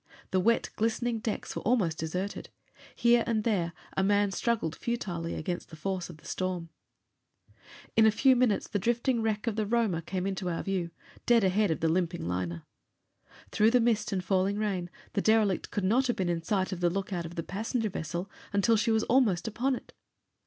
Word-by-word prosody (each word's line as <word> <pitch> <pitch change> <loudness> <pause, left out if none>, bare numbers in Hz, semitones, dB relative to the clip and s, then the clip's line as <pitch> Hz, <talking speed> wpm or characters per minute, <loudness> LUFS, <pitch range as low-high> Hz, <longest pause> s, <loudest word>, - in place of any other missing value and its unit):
The 185 - +3
wet, 230 +5 +2
glistening 230 +1 0
decks 220 -2 -4
were - - -3
almost 200 -9 +1
deserted. 180 +5 -3 0.5
Here 235 0 +4
and 220 -2 +1
there 185 -7 +1 0.2
a - - +2
man 205 0 +3
struggled 205 -7 -1
futilely 175 -8 -3
against 175 +2 -4
the 160 - -10
force 185 +2 -3
of 170 - -10
the - - -21
storm. 180 -3 -3 1.3
In 220 -1 +6
a - - +6
few 260 +5 +4
minutes 245 -4 +2
the 205 - -1
drifting 235 +3 +1
wreck 215 -1 -1
of 230 -2 -1
the 215 - +1
Roma 220 -7 +1
came 185 +2 -3
into 190 -2 -2
our 165 - -2
view, 190 -4 -1 0.4
dead 235 -3 +5
ahead 195 +2 +3
of 160 - -1
the 165 - +2
limping 175 - 0
liner. 85 -2 -3 0.9
Through 215 +1 +4
the 250 +2 +4
mist 230 -2 +1
and 190 -2 -1
falling 190 +1 +1
rain, 195 -5 -1 0.2
the 200 - +1
derelict 215 -3 +2
could 205 - -2
not 240 +8 +3
have 245 - +1
been 185 -2 -1
in 170 -1 0
sight 190 +2 0
of 185 - -4
the 175 -1 +3
lookout 185 -2 -3
of 170 - -11
the 165 - -3
passenger 220 +4 -2
vessel 170 +4 -4 0.2
until 205 +3 +3
she 225 +2 +1
was 220 0 +3
almost 225 -9 +2
upon 250 +5 0
it. - - -11
200 Hz, 195 wpm, -29 LUFS, 175-225 Hz, 1.3 s, In